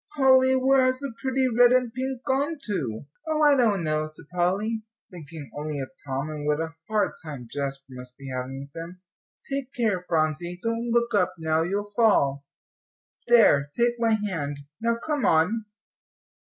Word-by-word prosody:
"Polly, 260 -1 +5
where 265 0 +4
has 255 0 +1
the 275 -2 -6
pretty 265 0 +1
red 245 0 +5
and 250 -2 +2
pink 260 0 -4
gone 280 +4 0
to?" 140 - -3 0.2
"Oh, 310 -1 +1
I 295 -1 +6
don't 215 -8 +2
know," 155 0 -1
said 155 - -11
Polly, 200 +6 0 0.3
thinking 160 -4 -10
only 150 0 -4
of 135 - -5
Tom, 135 +1 -3
and 150 -1 -5
what 150 0 +1
a 160 0 -3
hard 215 -1 +1
time 140 -7 -8
Jasper 140 -1 -4
must 125 0 -11
be 140 -1 -10
having 130 +1 -4
with 140 +1 -12
him. 170 +2 -8 0.5
"Take 275 -1 -3
care, 215 -7 0
Phronsie, 165 +2 0
don't 230 +1 -1
look 235 0 +1
up 200 -3 +2
now 160 0 +1
you'll 200 +4 -2
fall! 140 -12 +3 0.8
There, 210 -12 +5
take 240 0 +2
my 230 -1 +3
hand; 165 -9 -3 0.2
now 230 0 +2
come 290 +3 -2
on." 200 +7 +2
200 Hz, 170 wpm, -26 LUFS, 150-240 Hz, 0.8 s, I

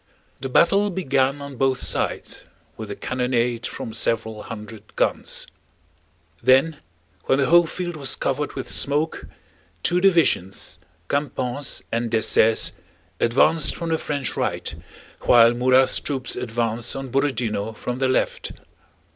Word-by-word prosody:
The 135 - -4
battle 200 +9 +3
began 140 -6 0
on 140 -2 -9
both 135 0 +1
sides - - -1 0.3
with 110 -2 -8
a 100 - -5
cannonade 125 -2 -1
from 110 - -6
several 110 -1 -1
hundred 105 0 -10
guns. - - 0 1.0
Then 135 +6 +4 0.5
when 135 - +2
the 140 - +2
whole 170 +2 +5
field 175 +1 -4
was 140 -3 +1
covered 145 +2 -2
with 135 - -6
smoke, 150 +3 0 0.6
two 180 +1 +2
divisions, 165 - +2 0.3
Campan's 140 -2 -2
and 115 0 -1
Dessaix's, 110 0 +4 0.5
advanced 150 +7 +3
from 170 -1 -4
the 160 -1 0
French 140 -4 -3
right, - - -2 0.5
while 115 -1 +6
Murat's 130 +2 +3
troops 135 -3 -3
advanced 115 0 -1
on 135 -2 -6
Borodinó 115 -6 -1
from 125 0 -4
their 130 -1 +1
left. 130 - -1
130 Hz, 130 wpm, -22 LUFS, 115-145 Hz, 1.0 s, while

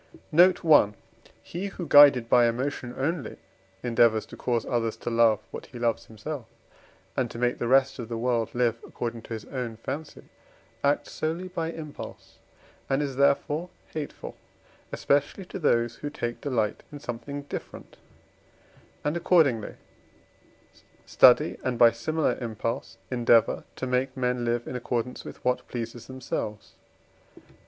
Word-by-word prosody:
Note 175 +3 +5
I. 145 -10 +6 0.5
He 180 +4 -5
who, 190 -3 -6
guided 140 -5 +8
by 120 0 +5
emotion 125 +1 -3
only, 145 +3 -2 0.5
endeavours 115 -2 +3
to - - -11
cause 120 -2 -1
others 115 -3 -1
to 120 - -4
love 115 -3 +4
what - - -8
he 125 - -11
loves 120 -1 -1
himself, 115 +4 -7 0.7
and 125 -3 0
to - - -9
make 125 +1 0
the 120 - -1
rest 130 +1 +3
of 115 - -6
the 115 - -3
world 115 -1 0
live 120 -2 +1
according 115 -1 -5
to 115 - -8
his 110 -2 -6
own 125 -4 -5
fancy, 140 +6 -6 0.6
acts 140 +1 +1
solely 165 +4 -3
by 165 -3 -3
impulse, 155 -3 -9 0.5
and 135 +2 +1
is, 140 -2 -4
therefore, 145 +4 +2 0.2
hateful, 155 -2 -6 0.6
especially, 145 +7 0
to 190 - -7
those 120 -6 +1
who 145 - -5
take 120 -5 -4
delight 115 -7 -1
in 145 - -8
something 140 +3 -6
different, 145 - -8 1.1
and 150 +2 0
accordingly 160 - +2 1.3
study - - +5
and, 125 -2 -1
by 115 -1 +7
similar 155 +7 -1
impulse, 115 +1 -4
endeavour, 120 -2 +3
to - - -4
make 130 +1 -1
men 125 -1 0
live 120 0 -1
in - - -5
accordance 125 0 -3
with - - -11
what 125 0 0
pleases 120 -1 -6
themselves. 120 -5 -5
125 Hz, 145 wpm, -27 LUFS, 115-145 Hz, 1.3 s, guided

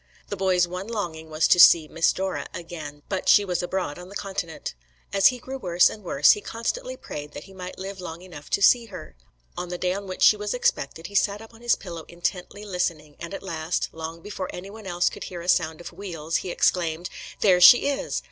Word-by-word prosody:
The - - -3
boy's 185 -2 +2
one 180 +3 -6
longing 170 -8 -4
was 155 0 +2
to 180 - +5
see 165 -2 +8
"Miss 165 +2 +2
Dora" 190 0 -3
again, 155 -4 -8
but 190 -2 -2
she 205 - +6
was 180 -2 -1
abroad 175 -4 -3
on 180 +1 -10
the 200 - -11
Continent. 190 - -5 0.4
As 195 -1 +6
he 250 - +1
grew 265 +2 -7
worse 175 -4 +4
and 210 - -10
worse, 145 -5 +5
he 210 - 0
constantly - - -4
prayed 145 0 -8
that - - -8
he 195 - -15
might 185 -1 -8
live 195 0 -7
long 170 0 -7
enough 165 -5 -11
to 200 - +1
see 235 +1 +5
her. 185 - -10 0.4
On 180 - -5
the 180 - -4
day 180 0 0
on 200 +1 -6
which 185 - -3
she - - +8
was 210 +2 -3
expected, 165 - -1
he 200 - -8
sat 200 +1 +2
up 225 +1 -13
on 225 - -17
his 240 0 +3
pillows 170 -4 -8
intently 180 +4 -4
listening, 170 -6 -3
and 170 - -7
at 195 - -6
last, 165 -2 -2
long 160 +1 -7
before 195 -3 -5
anyone 200 +3 -9
else 175 -1 +1
could - - -3
hear 175 -2 -7
a 170 - -9
sound 160 -3 +2
of 175 - -9
wheels, 165 -4 -3
he 185 - -5
exclaimed: 175 -1 +1 0.3
"There 180 -3 +5
she 245 +8 +9
is!" 285 -1 -1
180 Hz, 225 wpm, -25 LUFS, 165-200 Hz, 0.4 s, she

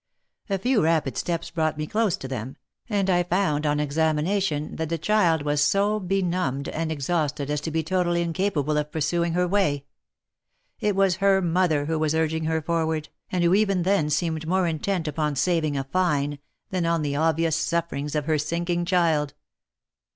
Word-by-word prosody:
A 195 - +1
few 245 +3 +2
rapid 155 -4 +1
steps 170 -1 -3
brought 155 -2 0
me 155 - -2
close 210 +1 0
to 135 - -7
them, 130 0 -5 0.3
and 200 -3 +1
I 175 -2 +3
found 175 -4 0
on 150 0 +1
examination 155 +2 0
that 160 -1 -2
the 165 - -1
child 170 -4 +2
was 145 0 +1
so 205 +5 +2
benumbed 180 -7 -1
and 160 0 -2
exhausted 150 -1 -1
as 150 -1 -1
to 160 - -3
be 160 0 -1
totally 175 0 +1
incapable 165 -4 0
of 150 0 -4
pursuing 170 +2 0
her 180 +1 +1
way— 170 -8 +1 0.9
it 210 -2 0
was 195 -2 +3
her 195 0 +4
mother 170 -4 +1
who 160 +1 -1
was 155 0 +1
urging 160 0 0
her 160 0 0
forward, 160 -1 -1 0.2
and 180 -1 +1
who 170 +1 +4
even 195 -3 +2
then 185 -5 +2
seemed 160 0 -1
more 185 +1 +2
intent 165 +1 -1
upon 150 0 -1
saving 155 -2 +1
a 135 - -1
fine, 145 -2 0 0.3
than 180 -3 0
on 165 -2 +1
the 145 -1 -1
ob 160 +1 +2
vious 165 -1 +1
sufferings 160 -3 -1
of 150 -2 0
her 155 -1 +1
sinking 170 +3 -1
child. 165 -6 +1
165 Hz, 180 wpm, -25 LUFS, 150-180 Hz, 0.9 s, her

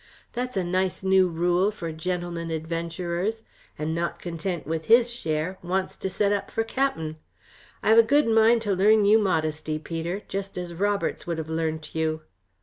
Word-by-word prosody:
That's 250 -1 -3
a 190 - +1
nice 185 +2 -1
new 190 -1 +5
rule 175 +3 +2
for 170 -6 -5
gentlemen 170 +1 -3
adventurers, 170 +6 -3 0.3
and 155 +1 -2
not 170 +1 -2
content 175 0 -4
with 160 +1 -3
his 235 +1 +5
share, 165 -2 -2
wants 185 +2 -2
to 190 - -3
set 200 +2 +1
up 205 -1 -1
for 225 - -1
cap'en. 195 - -1 0.7
I - - +2
have 225 +1 +8
a - - +11
good 285 +6 +3
mind 225 +1 +4
to 205 -2 +1
learn 210 +3 +4
you 215 +2 +6
modesty, 155 -5 0
Peter, 165 +5 -4
just 195 -1 -5
as 175 -1 -4
Roberts 200 +2 -1
would 170 -1 -2
have 160 -1 -5
learnt 160 -1 -2
you." 160 0 -1
180 Hz, 175 wpm, -26 LUFS, 165-205 Hz, 0.7 s, a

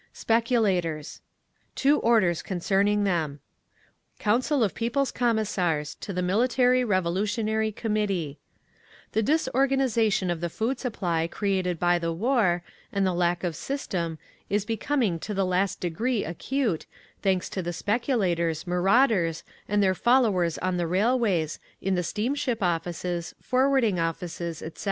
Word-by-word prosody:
SPECULATORS 200 - 0 0.5
Two 290 +2 +3
orders 210 -8 +3
concerning 200 +3 +1
them: 160 -7 -1 0.8
Council 250 +5 +1
of 205 - 0
People's 255 +4 0
Commissars 190 -10 0
To - - -5
the 180 -1 -2
Military 250 +6 +3
Revolutionary 215 +3 0
Committee 200 -9 -2 0.7
The 220 - +1
disorganisation 260 - +1
of 170 -1 -3
the 170 - -1
food 235 +9 -2
supply 175 -10 -1
created 185 -2 -1
by 175 +1 +2
the 165 -1 -1
war, 185 -2 +1 0.3
and 200 -1 +1
the 185 - +1
lack 175 0 0
of 170 -3 -2
system, 170 - -3 0.3
is 205 0 0
becoming 225 - 0
to 210 +5 -5
the 195 0 +1
last 185 +1 0
degree 215 +7 -1
acute, 210 - -2 0.3
thanks 190 -2 +1
to 190 - -2
the 175 0 -3
speculators, 180 - 0
marauders 180 -1 +2 0.2
and 205 0 +2
their 190 -1 +3
followers 200 -7 +2
on 185 -1 -1
the 175 -1 0
railways, 195 -4 +1 0.2
in 195 - -1
the 180 - +1
steamship 240 - -1
offices, 175 0 -2
forwarding 255 -7 +2
offices, 165 0 -3
etc. 160 0 -8
195 Hz, 130 wpm, -26 LUFS, 175-230 Hz, 0.8 s, Two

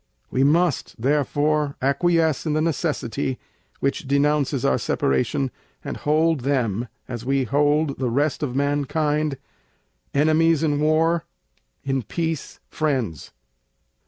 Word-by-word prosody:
We 130 - +2
must, 160 -2 +1
therefore, 145 +2 +1
acquiesce 160 +3 +1
in 150 - +1
the 155 - +1
necessity, 130 -5 -1 0.4
which 140 0 -1
denounces 140 -1 +1
our - - +2
Separation, 130 - 0 0.3
and - - -4
hold 155 +1 +2
them, 125 -4 0 0.2
as 120 -2 -6
we 135 +1 +1
hold 145 +2 +1
the 130 -2 0
rest 140 +4 0
of 130 -4 -2
mankind, 145 +1 0 0.7
Enemies 155 +2 +3
in 145 -2 +1
War, 160 +2 +2 0.6
in 135 -1 0
Peace 160 +5 -4
Friends. 130 - -2
145 Hz, 115 wpm, -23 LUFS, 135-155 Hz, 0.7 s, Enemies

